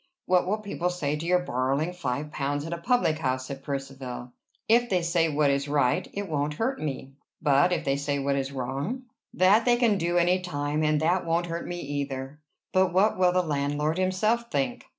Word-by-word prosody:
"What 180 -1 +3
will 210 +3 +1
people 200 -4 -2
say 150 -5 -2
to 155 +2 -5
your 180 0 +3
borrowing 135 +5 0
five 150 -3 -3
pounds 145 0 -2
at 165 - -4
a 170 - -4
public 200 -7 +1
house?" 130 -3 -1
said 135 0 -7
Percivale. 135 -3 -6 0.3
"If 240 +2 +4
they 180 -3 +1
say 170 -1 +2
what 145 -1 +2
is 140 +1 -1
right, 140 -4 +1
it 200 0 -4
won't 150 -2 -1
hurt 255 - -1
me." 135 -2 -4 0.3
"But 150 +4 +3
if 180 - -1
they 135 0 +1
say 140 0 -1
what 140 0 0
is 135 0 -2
wrong?" 140 - -3 0.3
"That 195 +5 +4
they 245 -1 +5
can 230 -5 +2
do 175 +1 0
any 175 +2 +3
time, 145 -3 -2
and 155 -1 +2
that 175 +3 +2
won't 170 +1 0
hurt 170 0 -4
me, 175 0 -4
either." 140 -1 -4 0.3
"But 185 -1 +3
what 190 +2 +2
will 180 -1 +5
the 180 0 +2
landlord 150 +1 -1
himself 215 +6 +1
think?" 250 -1 -2
155 Hz, 205 wpm, -27 LUFS, 140-185 Hz, 0.3 s, they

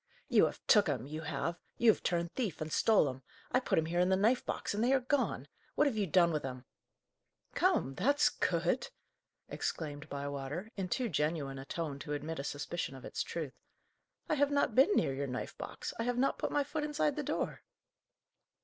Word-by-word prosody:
"You - - +6
have - - -8
took 205 -5 +5
'em, 130 -4 -1
you 155 +3 -5
have! 170 +2 -3 0.2
you 235 -2 +7
have - - -4
turned 170 -1 -1
thief, 215 - -2
and 155 0 -4
stole 215 -9 +4
'em! 130 0 -5 0.3
I 255 - +4
put 260 - 0
'em 160 - +3
here 170 +2 -1
in 180 +1 +4
the 190 - +4
knife 220 +6 +3
box, - - -3
and 210 +2 0
they 255 +3 +4
are 270 - +5
gone! 260 +2 0 0.3
What 295 - +4
have 275 -6 +1
you 205 -3 0
done 170 0 +4
with 150 -2 -1
'em?" 130 -1 -6 0.9
"Come, 360 - +2
that's 270 - +3
good!" - - 0 0.6
exclaimed 150 -1 -4
Bywater, 140 +7 -4
in 190 -2 -3
too 250 +6 0
genuine 150 -5 -1
a 135 - -8
tone 150 -2 -4
to 145 +1 -4
admit 150 +2 -4
a - - -3
suspicion 145 0 -3
of 130 - -10
its - - -3
truth. 155 -6 -4 0.7
"I - - +1
have 285 -1 +3
not 285 -5 +2
been 265 - +6
near 135 - +2
your 140 +1 -2
knife 125 -1 -4
box; - - -5
I - - +1
have 245 0 0
not 270 +2 +1
put - - -1
my 290 - +2
foot 295 +2 -3
inside 295 -1 0
the 300 - -1
door." 290 - -2
170 Hz, 210 wpm, -33 LUFS, -, 0.9 s, you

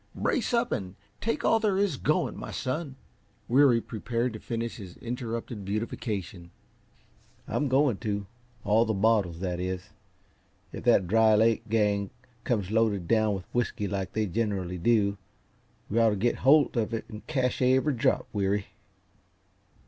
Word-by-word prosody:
Brace 235 - 0
up 235 0 +1
and 95 -2 -3 0.3
take 230 - -1
all 225 - +4
there 205 -3 +1
is 200 -6 +1
going, - - 0
my - - -7
son." 135 +1 -3 0.5
Weary 130 -1 +5
prepared 115 +2 -3
to 110 - -7
finish 115 +1 -4
his 95 -5 -10
interrupted 115 -2 -5
beautification. 100 -3 -4 1.0
"I'm 145 - 0
going 135 -4 +3
to 100 -2 -3 0.4
all 105 +2 +4
the 110 - -1
bottles, 95 -5 +2
that 90 -2 -2
is. 95 +2 -4 0.8
If - - -8
that 115 -6 +5
Dry 110 +2 +5
Lake 110 0 +2
gang 105 -3 +1 0.4
comes 105 -5 -1
loaded 110 -5 +1
down 110 -2 +2
with 95 -1 -9
whisky, 120 -4 -1
like 95 -1 -3
they 110 0 0
generally 95 -3 -2
do, 100 -1 +2 0.7
we 110 - 0
ought 115 -1 +5
to 105 - 0
get 115 +5 0
hold 145 +2 +4
of 115 0 0
it 115 - -5
and 110 -1 -10
cache 130 -5 0
every 130 +3 +3
drop, 115 - +1
Weary." 100 0 0
110 Hz, 155 wpm, -28 LUFS, 100-120 Hz, 1.0 s, Weary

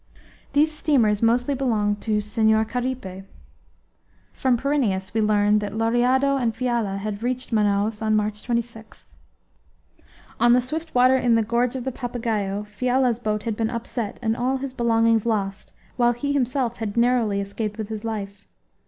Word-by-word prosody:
These 300 +2 +3
steamers 250 -9 +2
mostly 245 +4 +2
belong 220 -6 0
to 210 -1 -1
Senhor 220 +1 +2
Caripe. 245 -6 -4 1.1
From 255 -2 +1
Pyrineus 230 -9 -1
we 220 - +1
learned 210 0 +3
that 205 0 -5
Lauriado 250 +5 +2
and 235 -4 -1
Fiala 235 -5 -1
had 205 +1 -4
reached 250 +1 -3
Manaos 210 0 +1
on 215 -1 +1
March 210 0 -1
26. 235 -2 -5 1.3
On 240 0 +5
the 250 - +5
swift 310 +6 -5
water 255 +1 +5
in 245 -3 +3
the 225 - +3
gorge 235 +3 0
of 255 - -4
the 265 - -2
Papagaio 225 -5 -3
Fiala's 245 +3 0
boat 215 -3 -2
had 225 -2 -2
been 225 0 -1
upset 235 -2 -4
and 225 0 +1
all 255 +3 0
his 265 -1 -6
belongings 230 -2 +2
lost, 200 -3 -2 0.3
while 240 -1 +3
he 285 +4 -2
himself 255 -3 0
had 220 -1 -4
narrowly 235 -4 +2
escaped 205 +2 -4
with 215 -1 -5
his 215 -1 -5
life. 200 -3 -5
230 Hz, 160 wpm, -23 LUFS, 210-250 Hz, 1.3 s, On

